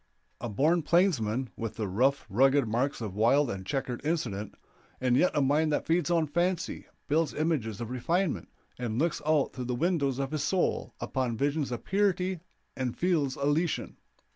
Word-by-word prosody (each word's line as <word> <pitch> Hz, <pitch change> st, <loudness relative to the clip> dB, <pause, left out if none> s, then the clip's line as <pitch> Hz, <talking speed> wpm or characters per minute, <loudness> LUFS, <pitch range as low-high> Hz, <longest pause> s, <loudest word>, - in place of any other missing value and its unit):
A 120 Hz, -, -4 dB
born 155 Hz, -, +2 dB
plainsman, 135 Hz, -, +1 dB
with 115 Hz, -2 st, -5 dB
the 110 Hz, -3 st, -2 dB
rough, 130 Hz, +9 st, +1 dB
rugged 135 Hz, +4 st, +3 dB
marks 120 Hz, +5 st, -1 dB
of 105 Hz, -4 st, -4 dB
wild 120 Hz, +6 st, +3 dB
and 95 Hz, -1 st, -5 dB
checkered 125 Hz, +2 st, -3 dB
incident, 120 Hz, -, -2 dB, 0.4 s
and 125 Hz, -1 st, +2 dB
yet 180 Hz, -, +4 dB
a 145 Hz, -, +3 dB
mind 150 Hz, +3 st, +2 dB
that 145 Hz, -, 0 dB
feeds 170 Hz, +2 st, +1 dB
on 170 Hz, -2 st, +3 dB
fancy, 175 Hz, +3 st, -1 dB, 0.2 s
builds 155 Hz, +2 st, +1 dB
images 145 Hz, -10 st, -1 dB
of 120 Hz, 0 st, -5 dB
refinement, 145 Hz, -, -1 dB, 0.3 s
and 115 Hz, -3 st, -2 dB
looks 165 Hz, +4 st, 0 dB
out 155 Hz, -3 st, +2 dB
through 125 Hz, -2 st, -5 dB
the 125 Hz, 0 st, -1 dB
windows 140 Hz, -3 st, +1 dB
of 135 Hz, -1 st, -2 dB
his 155 Hz, -2 st, -1 dB
soul 185 Hz, +2 st, 0 dB
upon 125 Hz, -4 st, -2 dB
visions 145 Hz, 0 st, 0 dB
of 120 Hz, -, -4 dB
purity 190 Hz, -2 st, +1 dB, 0.4 s
and 130 Hz, -3 st, -3 dB
fields 160 Hz, -7 st, +1 dB
elysian. 145 Hz, +4 st, 0 dB
140 Hz, 170 wpm, -29 LUFS, 120-165 Hz, 0.4 s, yet